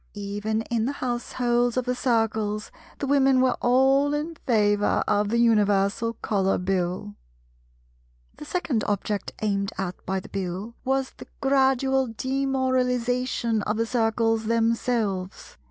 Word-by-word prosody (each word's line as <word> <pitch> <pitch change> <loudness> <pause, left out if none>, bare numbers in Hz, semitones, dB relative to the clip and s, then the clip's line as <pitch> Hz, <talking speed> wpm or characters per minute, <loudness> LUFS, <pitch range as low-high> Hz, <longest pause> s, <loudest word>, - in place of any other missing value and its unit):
Even 205 +2 -2
in 230 -1 -1
the 275 - -1
households 245 -1 -1
of 255 - 0
the 250 - 0
Circles, 225 -4 0 0.3
the - - -3
Women 270 -1 +4
were 255 -1 +3
all 270 +3 +3
in 305 +3 -3
favour 205 -3 +2
of 205 0 +1
the 235 - +1
Universal 210 -1 +2
Colour 195 -2 +1
Bill. 180 - -2 1.2
The - - -9
second 295 - -1
object 205 0 -2
aimed 200 -2 0
at 185 -2 -4
by 190 +1 0
the - - -12
Bill 195 +4 -4
was 265 0 0
the - - -13
gradual 265 -1 +2
demoralization 255 -3 0
of 210 +1 -2
the 230 - +1
Circles 225 -1 +1
themselves. 225 -4 -1
230 Hz, 130 wpm, -25 LUFS, 205-260 Hz, 1.2 s, Women